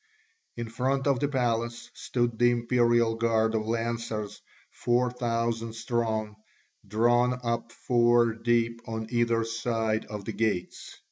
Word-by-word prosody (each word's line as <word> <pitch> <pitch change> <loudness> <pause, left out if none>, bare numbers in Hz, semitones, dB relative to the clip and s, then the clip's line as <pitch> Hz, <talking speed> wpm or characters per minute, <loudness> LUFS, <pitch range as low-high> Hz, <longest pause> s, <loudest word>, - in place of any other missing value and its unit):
In 120 -1 -4
front 130 +4 -1
of 140 -3 +2
the 145 - +1
palace 120 -3 -1
stood 120 -2 -2
the 120 0 +6
imperial 120 -1 +2
guard 115 -1 +1
of 110 -1 -1
lancers, 115 -2 -3 0.3
four 120 +1 +1
thousand 115 -2 -2
strong, 110 -2 -2 0.5
drawn 120 +4 +2
up 115 0 -2
four 120 -1 +3
deep 115 0 0
on 110 0 -3
either 115 -1 +2
side 115 -1 -1
of 105 -2 -7
the 110 - -4
gates. 105 -6 -2
115 Hz, 130 wpm, -28 LUFS, 115-120 Hz, 0.5 s, the